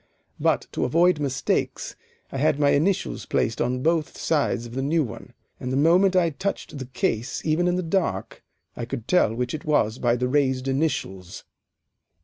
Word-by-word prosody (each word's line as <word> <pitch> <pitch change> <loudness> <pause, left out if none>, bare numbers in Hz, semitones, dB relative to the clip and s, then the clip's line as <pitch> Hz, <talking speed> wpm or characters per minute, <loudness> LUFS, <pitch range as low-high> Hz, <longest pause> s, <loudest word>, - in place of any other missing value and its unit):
But - - +1
to - - -2
avoid 170 +5 +3
mistakes, 135 -2 -1 0.4
I 135 - -3
had 150 0 +2
my 145 -1 +4
initials 175 +7 0
placed 115 - 0
on 125 +1 -1
both 160 -1 0
sides 145 -6 0
of 120 - -9
the 135 - -2
new 155 +4 +2
one, 115 -2 -9 0.3
and 125 - -4
the 130 - 0
moment 180 +6 +4
I 170 -3 +3
touched 190 -3 -4
the 130 - -6
case, 120 -1 -2
even 165 +3 +2
in 175 - +2
the 185 - -1
dark, 165 - -2 0.3
I 120 - -5
could 125 -2 -6
tell 145 -12 +3
which 125 +1 -2
it 155 - -5
was 125 -7 +1
by 120 -1 +2
the 125 +1 -1
raised 130 -1 +1
initials. 130 - -2
140 Hz, 180 wpm, -24 LUFS, 125-165 Hz, 0.4 s, my